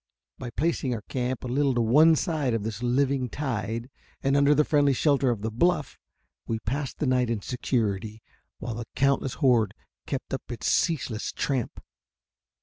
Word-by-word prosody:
By 125 - -5
placing 140 -2 -1
our 105 - -7
camp 125 +1 -3
a - - -4
little 135 +1 +1
to 120 - +2
one 150 +8 +6
side 150 -7 0
of 110 - -2
this 110 +1 -4
living 130 +1 +1
tide, 115 -4 -3 0.4
and 135 +1 +2
under 140 +1 +5
the 150 - +4
friendly 145 -2 +3
shelter 140 -1 +2
of 110 -4 -2
the 110 - -2
bluff, 150 +6 0 0.5
we 115 - -1
passed 130 +5 -3
the - - -1
night 125 -2 +2
in 115 -3 -1
security, 110 -4 -2 0.3
while 120 +1 -5
the 115 +1 -5
countless 135 -1 +1
horde 120 -7 +2 0.3
kept 135 -1 -4
up 130 - -5
its 115 - -6
ceaseless 135 -10 0
tramp. 130 -5 -2
125 Hz, 170 wpm, -26 LUFS, 115-140 Hz, 0.5 s, one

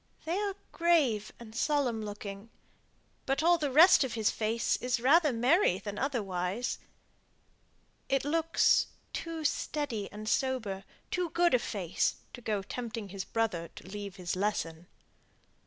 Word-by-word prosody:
They 330 +2 -1
are 405 -2 -1 0.2
grave 295 - +2
and 225 -2 -11
solemn 255 -5 +1
looking; 205 0 -7 0.8
but 270 +3 +1
all 345 0 +5
the 295 -2 0
rest 315 +5 +7
of 255 -3 -3
his 220 -2 +2
face 225 +1 0
is 250 0 -1
rather 295 +5 +5
merry 245 - +3
than 205 +1 -6
otherwise. 210 -4 -2 1.3
It 270 0 +1
looks 330 +2 +3 0.3
too 330 -1 -4
steady 275 -9 -2
and 215 +1 -8
sober, 220 -7 -1 0.3
too 360 -2 0
good 345 0 +3
a 250 - +5
face, 190 -7 -1 0.2
to 245 - -9
go 210 -4 -1
tempting 225 -1 -5
his 190 0 -5
brother 210 -7 -1
to - - -11
leave 200 -1 -6
his 180 -2 -3
lesson." 175 -4 -2
230 Hz, 140 wpm, -31 LUFS, 205-290 Hz, 1.3 s, rest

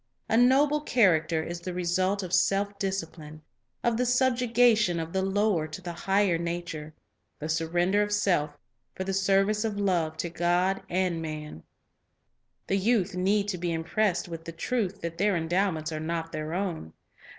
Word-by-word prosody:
A - - +1
noble 275 +5 +4
character 170 - +2
is 170 +1 -5
the 180 0 -5
result 185 +3 0
of 180 -1 -6
self 200 +1 +1
discipline, 160 -5 -5 0.4
of 235 -2 +1
the 250 - +1
subjection 240 -6 +3
of 165 0 -5
the 190 - +1
lower 195 -4 +1
to 155 +3 -8
the 175 -2 -6
higher 195 0 +1
nature, 170 -3 -5 0.2
— - - -48
the 155 - -4
sur 160 +1 -1
render 175 +5 +2
of 210 0 -1
self 175 -8 +1 0.4
for 190 - -3
the 195 +1 -3
service 195 +2 +2
of 210 -2 -2
love 170 -6 0
to 170 - -3
God 175 +3 +1
and 180 -2 0
man. 155 - -6 1.0
The 195 - 0
youth 200 -2 +1
need 200 +3 +1
to 180 -3 -3
be 175 0 -2
impressed 175 +4 0
with 165 -1 -7
the 165 - -5
truth 200 +2 -2
that 170 0 -5
their 205 0 +2
endowments 165 -1 0
are 155 - -3
not 165 +1 -3
their 155 +2 -4
own. 175 - -3
185 Hz, 175 wpm, -27 LUFS, 165-205 Hz, 1.0 s, noble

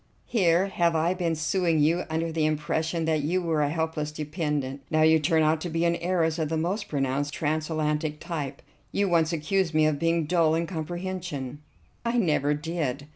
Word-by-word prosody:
Here 180 -5 +3
have 170 -4 +1
I 165 +3 +2
been 175 -3 -1
suing 165 +2 +1
you 165 +4 +2
under 160 +1 -1
the 160 -1 +1
impression 160 +2 -1
that 160 -2 +1
you 170 +6 0
were 165 -4 0
a 145 - +2
helpless 160 -1 -2
dependent. 150 -3 -3
Now 155 0 +3
you 160 0 +6
turn 160 +1 +2
out 155 +1 +2
to 175 - -3
be 165 +1 0
an 170 0 +2
heiress 170 -2 0
of 155 -2 -1
the 160 - 0
most 190 +6 -1
pronounced 140 0 -1
transatlantic 155 0 -1
type. 145 -5 -5 0.3
You 200 0 +1
once 165 -2 +2
accused 165 +1 0
me 155 0 +5
of 155 -2 +1
being 165 -1 +1
dull 160 -1 +3
in 165 +1 0
comprehension." 170 -5 -5 0.4
"I 235 +1 0
never 150 - +2
did." 150 -3 -3
160 Hz, 185 wpm, -26 LUFS, 150-170 Hz, 0.4 s, you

